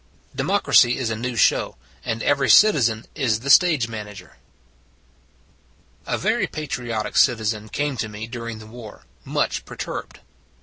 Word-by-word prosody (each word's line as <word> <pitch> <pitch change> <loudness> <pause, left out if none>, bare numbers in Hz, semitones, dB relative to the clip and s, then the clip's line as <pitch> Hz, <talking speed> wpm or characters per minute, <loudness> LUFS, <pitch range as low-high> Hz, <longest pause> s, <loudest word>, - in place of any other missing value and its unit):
DEMOCRACY 120 0 +3
IS 120 -4 -2
A - - -2
NEW 120 +2 -4
SHOW, 100 - +2 0.3
AND 115 0 -3
EVERY 140 -2 +1
CITIZEN 120 - +4
IS 115 -7 -1
THE 140 +2 +1
STAGE 155 -8 +5
MANAGER 105 -3 -9 1.7
A - - -1
VERY - - 0
patriotic 120 -7 -4
citizen 110 -3 +1
came 145 +1 -2
to 110 -1 -3
me 105 +1 -7
during 115 -1 -7
the 110 - -12
war, 110 - -12 0.2
much - - -2
perturbed. - - -7
115 Hz, 135 wpm, -22 LUFS, 110-130 Hz, 1.7 s, STAGE